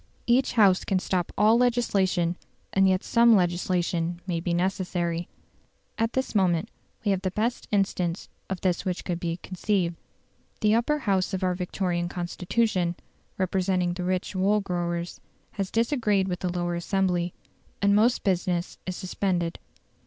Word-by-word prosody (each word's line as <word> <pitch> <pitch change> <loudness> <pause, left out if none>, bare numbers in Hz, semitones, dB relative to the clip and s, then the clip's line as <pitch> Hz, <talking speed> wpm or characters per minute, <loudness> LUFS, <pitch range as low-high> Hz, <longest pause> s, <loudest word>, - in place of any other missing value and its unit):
Each 250 +3 +3
House 200 -5 +5
can 195 - +1
stop 185 -1 -1
all 215 +3 +5
legislation, 195 -8 +2 0.4
and 195 0 +4
yet 185 0 +1
some 235 -1 +5
legislation 175 -2 0
may 175 -3 -1
be 175 +1 -2
necessary. 175 -1 -1 0.7
At 225 +1 0
this 260 0 -1
moment 180 -5 +2 0.4
we 205 - +3
have 190 -1 0
the 190 - 0
best 225 +6 -2
instance 190 -3 0 0.2
of 190 -2 -3
this 180 -2 0
which 180 -1 -3
could 175 -2 -2
be 170 -1 -2
conceived. 185 -2 -1 0.7
The 215 -1 +4
Upper 240 +7 +2
House 195 -7 0
of 190 - -3
our 185 -1 +2
Victorian 180 -1 -2
Constitution, 180 +1 -1 0.4
representing 185 -1 +1
the 180 0 -4
rich 185 +2 -2
wool 200 +3 +3
growers, 175 -2 -3 0.3
has 195 -1 -3
disagreed 225 -5 +1
with 180 -2 -3
the 180 - -2
Lower 175 0 -1
Assembly, 175 0 0 0.4
and 200 0 +3
most 230 +4 +3
business 180 -2 -1
is 185 - -2
suspended. 180 -3 -1
185 Hz, 150 wpm, -26 LUFS, 175-200 Hz, 0.7 s, House